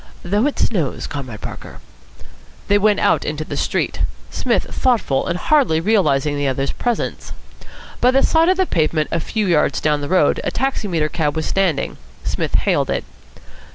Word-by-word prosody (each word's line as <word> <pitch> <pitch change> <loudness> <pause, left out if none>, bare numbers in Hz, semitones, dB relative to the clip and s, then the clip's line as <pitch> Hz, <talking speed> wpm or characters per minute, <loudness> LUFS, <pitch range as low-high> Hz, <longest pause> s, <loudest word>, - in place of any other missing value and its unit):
"Though 205 +8 +1
it 295 - -3
snows, 170 - -1
Comrade 130 -7 -6
Parker." - - -8 0.9
They 205 0 +5
went 210 0 +3
out - - +2
into 150 +1 -3
the - - -5
street, - - -1 0.3
Psmith - - 0
thoughtful 230 - +1
and 170 - -1
hardly 255 - +2
realising 155 -7 +2
the 145 -1 -1
other's 135 +1 -1
presence. 240 -2 -3 0.7
By 245 - +5
the 270 +1 +3
side 325 +2 +4
of 370 - +3
the 375 - +3
pavement 155 - 0
a 170 - 0
few 215 +6 -2
yards 170 -5 +2
down 150 -1 +1
the 145 - -4
road 180 -5 +3
a - - 0
taximeter 205 - -1
cab 150 -2 -1
was 160 - -2
standing. 180 -7 0 0.3
Psmith - - -2
hailed - - +1
it. - - -1
170 Hz, 170 wpm, -19 LUFS, 150-220 Hz, 0.9 s, They